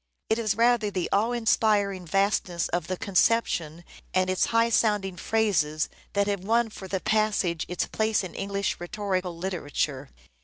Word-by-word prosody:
It 220 - +3
is 215 -3 0
rather 235 -2 +3
the 185 -3 -2
awe 215 +4 +2
inspiring 210 -5 +1
vastness 195 -2 0
of 175 -2 -2
the 185 - -3
conception 175 -6 +1 0.3
and 185 0 +2
its 185 - +2
high 230 0 +2
sound 210 -4 +2
ing 190 -2 -5
phrases 170 -7 0 0.2
that 200 0 +2
have 200 -2 -2
won 225 +2 +1
for 190 - -9
the 190 0 -2
passage 210 -6 +1
its 180 +1 -1
place 220 -1 0
in 185 - -7
English 200 0 -2
rhetorical 185 -1 -3
literature. 150 -6 -3
195 Hz, 160 wpm, -26 LUFS, 180-215 Hz, 0.3 s, It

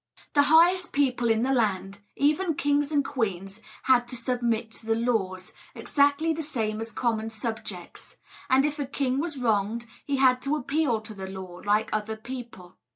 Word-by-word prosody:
The 285 - +6
highest 340 +5 +4
people 255 -4 +1
in 225 +1 +2
the 270 +1 +2
land, 200 -4 0 0.2
even 310 +4 +1
kings 290 +1 +1
and 285 -2 +2
queens, 200 -6 -3 0.2
had 245 -2 +4
to 250 - -5
submit 235 -2 -1
to 225 - -9
the 225 - +2
laws, 205 -6 -1 0.2
exactly 285 +3 +2
the 320 - -4
same 220 -7 -2
as 225 0 -5
common 225 -3 -1
subjects; 220 -5 -6 0.3
and 265 +2 +5
if 300 0 -2
a 280 - -2
king 270 -1 -1
was 315 -1 -3
wronged, 225 -1 0 0.2
he 280 -1 0
had 255 -1 +4
to 280 +3 0
appeal 280 -4 0
to 220 0 -9
the 190 -2 -7
law, 190 -2 -8
like 210 +1 +1
other 215 +1 -2
people. 235 -6 -9
240 Hz, 175 wpm, -27 LUFS, 215-285 Hz, 0.3 s, The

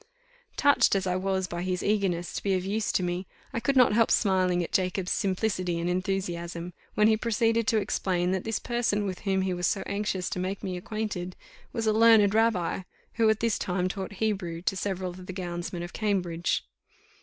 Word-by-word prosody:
Touched 285 -7 +4
as 195 -1 0
I 180 -1 0
was 190 0 0
by 175 -1 -5
his 180 0 -2
eagerness 195 -5 0
to - - -3
be 195 -2 +1
of 185 0 -2
use 210 +2 0
to 185 - +1
me, 175 +1 -2 0.3
I - - 0
could 270 +4 0
not 250 -4 +6
help 230 +1 +4
smiling 185 -3 +2
at - - -6
Jacob's 185 0 0
simplicity 185 -3 0
and 170 - -2
enthusiasm, 180 -2 -2 0.2
when 210 - +5
he 220 - +5
proceeded 230 0 +1
to 225 - +3
explain, 185 -3 0
that 190 -1 -1
this 225 0 -1
person 235 -4 0
with 185 -2 -4
whom 190 -2 0
he 190 -1 0
was 180 -1 0
so 195 - 0
anxious 200 -3 -2
to - - -2
make 190 +2 -3
me 185 -1 -3
acquainted 185 -1 -4 0.4
was 225 - -2
a 215 - +3
learned 220 -2 +6
rabbi, 220 -7 +2 0.4
who 220 - +6
at 220 -1 +1
this 230 -2 +1
time 180 0 0
taught 190 +1 -5
Hebrew 190 -5 -2
to 195 - 0
several 190 -1 -2
of 180 +1 -11
the 185 - -5
gownsmen 175 -1 -4
of 175 - -8
Cambridge. 180 -6 -1
190 Hz, 200 wpm, -28 LUFS, 180-215 Hz, 0.4 s, not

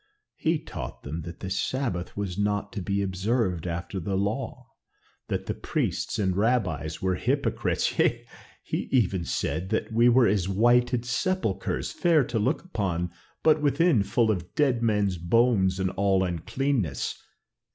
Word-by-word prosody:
He 165 0 +1
taught 110 - -8
them 80 +4 -4
that 85 0 -9
the 95 - -4
Sabbath 95 -3 -2
was 100 -3 -3
not 105 0 -1
to 100 - -4
be 100 +2 -1
observed 95 -2 -1
after 85 +3 -4
the 95 +3 -2
law, 120 +4 -3 0.6
that - - -2
the - - -2
priests - - -2
and 95 -4 +1
rabbis 95 -9 0
were 95 -1 +2
hypocrites; - - 0
yea, - - +2 0.4
he - - -3
even 100 -8 +2
said 80 +6 -2
that 110 +1 -1
we 120 +2 +5
were 120 0 +5
as 95 -3 +1
whited 120 +4 +3
sepulchres, 125 - -1
fair 165 -4 +3
to 120 -2 -2
look 130 +9 0
upon, 90 - -2 0.3
but 155 -1 +4
within 150 - +3
full 110 +3 +2
of 90 -4 -4
dead 130 -6 +2
men's 105 -5 +1
bones 95 0 +3
and 95 -1 0
all 95 0 +2
uncleanness. 95 - -1
100 Hz, 150 wpm, -27 LUFS, 95-120 Hz, 0.6 s, we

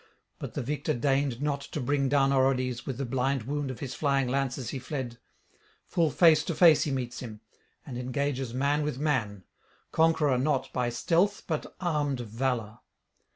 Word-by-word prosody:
But - - -7
the - - -2
victor 145 +4 -1
deigned 135 0 0
not 145 -1 0
to 145 - -6
bring 140 +1 +1
down 135 -1 +3
Orodes 130 -2 +1
with 130 -4 -3
the 135 - -2
blind 130 +1 0
wound 145 +3 -2
of 130 - -7
his 135 -3 -4
flying 140 -2 +1
lance 135 0 0
as 130 -4 -5
he 135 - -4
fled; 130 -3 -5 0.7
full 170 -3 +1
face 160 +1 +5
to 170 - -2
face 155 -3 +6
he 150 - -1
meets 125 -2 -3
him, 110 -4 -8 0.4
and 125 -4 -6
engages 135 0 -2
man 140 +4 +1
with 150 -3 -2
man, 125 -10 -1 0.5
conqueror 155 -5 +3
not 135 -1 0
by 125 -1 0
stealth 175 +11 +1
but 155 -3 -4
armed 150 -7 0
valour. 115 -1 -2
135 Hz, 175 wpm, -28 LUFS, 125-145 Hz, 0.7 s, face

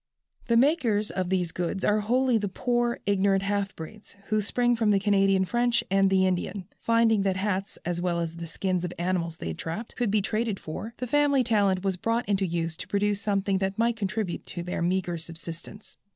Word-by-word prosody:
The 235 -2 +3
makers 235 -7 +2
of 185 -2 -2
these 180 -3 0
goods 180 +3 -2
are 210 +1 +3
wholly 245 +2 +2
the 205 - -2
poor, 240 +4 0
ignorant 195 -1 +2
half 200 0 -1
breeds, 205 +8 -10
who 215 -1 +2
spring 240 +3 +1
from 225 -2 +1
the 205 - +5
Canadian 195 -1 +3
French 240 +3 +1
and 195 0 +4
the 190 0 +3
Indian. 185 +1 -1
Finding 230 -2 +3
that 190 -1 0
hats, 195 0 -2
as 175 0 -1
well 175 -1 0
as 165 0 -3
the 170 0 -6
skins 180 +2 -1
of 180 - -2
the 175 - -11
animals 170 -2 -1
they 80 - -4
trapped, 165 - -6
could 240 -3 0
be 210 +1 +3
traded 215 -1 -1
for, 220 +9 -7
the 250 - -3
family 280 +1 +3
talent 200 -5 +2
was 190 -2 0
brought 230 +6 -1
into 195 -2 +1
use 165 -1 -2
to - - -7
produce 205 0 0
something 200 -2 +1
that 190 0 -2
might 230 +1 +2
contribute 205 -3 -3
to 175 - -5
their 180 0 -3
meagre 175 -1 0
subsistence. 165 +5 -9
195 Hz, 205 wpm, -27 LUFS, 180-225 Hz, -, the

